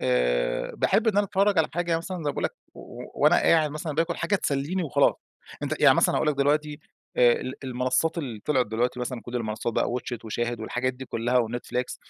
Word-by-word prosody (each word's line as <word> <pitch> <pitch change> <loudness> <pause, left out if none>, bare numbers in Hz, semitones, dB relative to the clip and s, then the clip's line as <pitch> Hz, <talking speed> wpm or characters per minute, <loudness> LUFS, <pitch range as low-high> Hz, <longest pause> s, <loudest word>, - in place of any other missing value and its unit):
آآ، - - 0
باحب 225 +2 +1
إن 205 - +1
أنا 205 - +3
أتفرّج 195 -1 +2
على 155 - +3
حاجة 170 -1 0
مثلًا 180 +3 -5
زي 165 - -6
ما 145 - 0
باقول - - -4
لَك - - -1 0.6
وأنا 150 +4 +4
قاعد 155 -2 +3
مثلًا 155 +1 -4
باكل 165 +2 0
حاجة 185 +5 -1
تسليني 150 +3 -1
وخلاص، 155 - +3 0.5
أنتَ - - -3
يعني - - +7
مثلًا - - +3
هاقول 155 - +1
لَك 150 - +2
دلوقتي 150 +2 0 0.4
آآ 120 -1 +6
ال 130 +1 -5
المنصات 130 +6 0
اللي 120 -8 -5
طلعت 130 -5 +2
دلوقتي 120 +3 -1
مثلًا 125 -1 -4
كل 125 0 -5
المنصات 110 0 -3
بقى - - +1
watch 120 0 -3
it 115 - -20
وشاهد 120 +1 -3
والحاجات 125 +3 -2
دي 130 - -8
كلّها 120 +1 +1
وNetflix، 125 +1 -4
135 Hz, 210 wpm, -26 LUFS, 120-165 Hz, 0.6 s, يعني